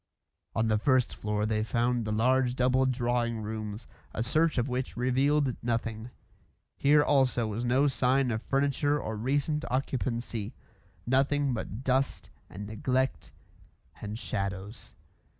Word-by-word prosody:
On 110 0 +1
the 110 -1 +2
first 130 +1 +2
floor 105 0 -1
they 110 0 0
found 120 +1 0
the 105 - -2
large 125 +3 +2
double 130 +1 +3
drawing 120 -2 0
rooms, 110 0 -5 0.3
a 115 - 0
search 155 +6 +2
of 120 +1 +1
which 125 -1 -3
revealed 135 +2 +2
nothing. 115 -1 -2 0.7
Here 145 +1 +4
also 130 -5 +2
was 110 +2 -3
no 130 +4 +3
sign 135 -1 +2
of 110 -1 -2
furniture 145 +2 +1
or 110 - -4
recent 145 +7 0
occupancy; 120 -3 -2 0.5
nothing 135 +2 +2
but 110 +1 -5
dust 130 +1 0 0.2
and 100 +3 -7
neglect 130 +5 -1 0.7
and 105 +1 -5
shadows. 100 -1 -5
125 Hz, 135 wpm, -29 LUFS, 110-135 Hz, 0.7 s, Here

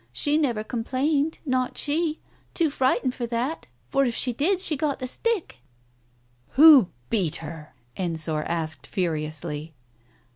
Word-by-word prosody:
She 290 - +1
never 250 -9 +1
complained, 275 +7 -1
not 255 -2 -1
she 310 +1 0 0.2
— - - -36
too 325 -4 +2
frightened 260 -2 +1
for 240 -2 -4
that, 245 +7 -3 0.2
for 275 - +2
if 240 -3 -1
she 250 - -1
did 350 - +1
she 335 -5 +2
got 290 -1 -1
the 255 - -5
stick 430 - -2 0.3
" 120 0 -38
" 120 +1 -39
Who 285 - +9 0.2
beat 190 -9 +1
her? 155 -2 -8
" 120 - -39
Ensor 160 -4 -1
asked, 155 -4 -3
furiously. 155 -3 -3
240 Hz, 155 wpm, -25 LUFS, -, 0.3 s, Who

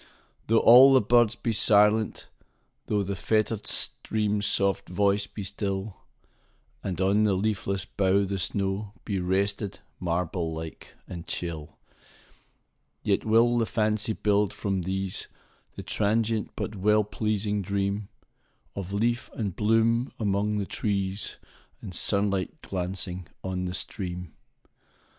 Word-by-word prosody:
Though 115 - +4
all 130 +4 +9
the - - +7
birds 120 +1 +4
be 115 -1 -2
silent,—thoughThe 105 -1 0
fettered 110 +1 0
stream's 105 -1 0
soft 100 0 +1
voice 100 +2 +1
be 105 - -7
still, 100 0 -3 0.9
And 95 -2 -3
on 100 +3 +3
the 105 -3 +3
leafless 100 -1 -1
bough 100 0 +2
the 100 0 -3
snowBe 100 +1 -2
rested, 100 +2 0 0.2
marble 85 -1 -1
like 80 0 -8
and 85 -2 -8
chill,—Yet 80 -3 -7
will 115 +2 +4
the 115 - +1
fancy 110 0 0
build, 105 -1 +1
from 95 -2 -1
these, 95 +1 -3 0.5
The - - -7
transient 110 +1 0
but 105 - -4
well 105 +2 +3
pleasing 105 0 -1
dreamOf 100 -1 -5
leaf 120 +4 0
and 100 -6 -3
bloom 115 +3 +2
among 105 0 0
the 100 - -1
trees, 100 -1 -2 0.4
And 95 - -8
sunlight 100 0 0
glancing 90 -1 -4 0.2
on 90 -1 -2
the 90 0 -3
stream. 90 -3 -5
100 Hz, 115 wpm, -27 LUFS, 95-110 Hz, 0.9 s, all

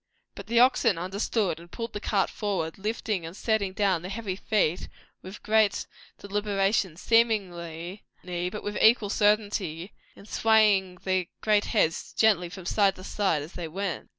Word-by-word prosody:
But 200 - -10
the 235 +1 +3
oxen 240 -5 +4
understood, 190 0 -1
and 170 +1 -14
pulled 230 -1 -6
the 205 - -4
cart 205 -2 0
forward; 190 -5 -3
lifting 210 -2 -2
and 165 +4 -8
setting 215 -4 0
down 190 -3 +1
their 180 - -7
heavy 200 -2 -4
feet 190 -4 0 0.3
with 190 +2 -10
great 215 -1 +2 0.3
deliberation 200 -3 -1
seemingly, 185 -5 0 0.2
but 180 +3 -4
with 205 0 -3
equal 220 -3 +5
certain'ty, 205 -5 0 0.2
and 200 - -15
swaying 210 -5 +3
their 185 -2 0
great 210 -1 +2
heads 165 -8 0
gently 200 -6 +3
from 190 -1 -10
side 195 0 +2
to 185 - -11
side 190 -7 0
as 155 - -11
they 175 -2 -5
went. 190 +3 -4
200 Hz, 155 wpm, -27 LUFS, 180-215 Hz, 0.3 s, equal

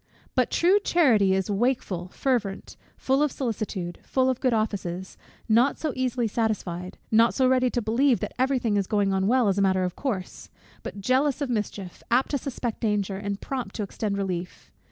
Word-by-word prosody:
But - - +2
true 370 +4 +4
charity 230 - +3
is 190 +2 -1
wakeful, 200 -5 -1
fervent, 215 -2 -2 0.2
full 270 +2 +1
of 300 -2 +2
solicitude, 215 -9 -4
full 260 0 +1
of 255 - -4
good 255 - +2
offices, 190 -5 -2 0.3
not 235 +5 +3
so 310 -4 -2
easily 250 -2 0
satisfied, 195 -5 -2
not 225 +1 +4
so 260 -1 +3
ready 255 -1 +3
to 240 -1 -2
believe 240 +4 +2
that - - -4
every 265 +1 +2
thing 225 -4 0
is 195 -2 0
going 200 -2 +1
on 190 0 +1
well 245 0 +3
as 195 0 +1
a - - +3
matter 190 -1 +2
of 180 -1 -2
course; 205 -10 -4 0.3
but 200 - -7
jealous 260 +6 +2
of 280 -4 -2
mischief, 205 -5 -4
apt 245 +3 +2
to 285 - 0
suspect 245 -4 -4
danger, 205 -3 0
and 200 0 -4
prompt 255 -7 -4
to 210 - -2
extend 200 +1 -3
relief. 180 -3 -4
220 Hz, 190 wpm, -26 LUFS, 195-255 Hz, 0.3 s, true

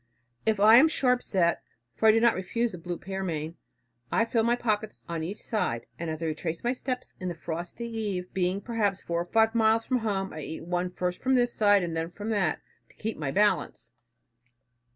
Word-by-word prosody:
If 215 -2 +2
I 215 +3 +8
am 295 +6 +8
sharp 250 -5 +2
set, 170 -3 +1 0.3
for 220 - +2
I - - +9
do 225 - +3
not 235 0 +5
refuse 230 +6 -1
the 180 - -8
blue 175 +1 -4
pearmain, 170 -5 -4 0.6
I 230 - +3
fill 230 0 +1
my 235 +2 +3
pockets 215 -3 -2
on 170 -1 -3
each 180 +6 -5
side; 115 - -2
and 170 -1 -3
as 160 +1 -4
I - - 0
retrace 160 +1 -3
my 240 +1 +1
steps, 255 -1 -4
in 185 - -4
the 175 - -3
frosty 170 +8 -5
eve 205 -6 -4
being 185 +1 0
perhaps 210 -5 -1
four 170 0 -1
or - - -4
five 225 +4 +3
miles 225 0 +3
from 255 -1 +1
home, 195 -4 -2
I 155 - -6
eat 160 +2 -6
one 180 +1 -1
first 180 0 -3
from 265 0 +2
this 245 -1 +2
side, 205 -3 +4
and 170 -2 -3
then 165 +1 -2
from 205 +5 -6
that, 195 -7 0 0.3
to - - -22
keep 220 +1 -4
my 145 -3 -2
balance." 135 - +1
195 Hz, 215 wpm, -28 LUFS, 170-225 Hz, 0.6 s, I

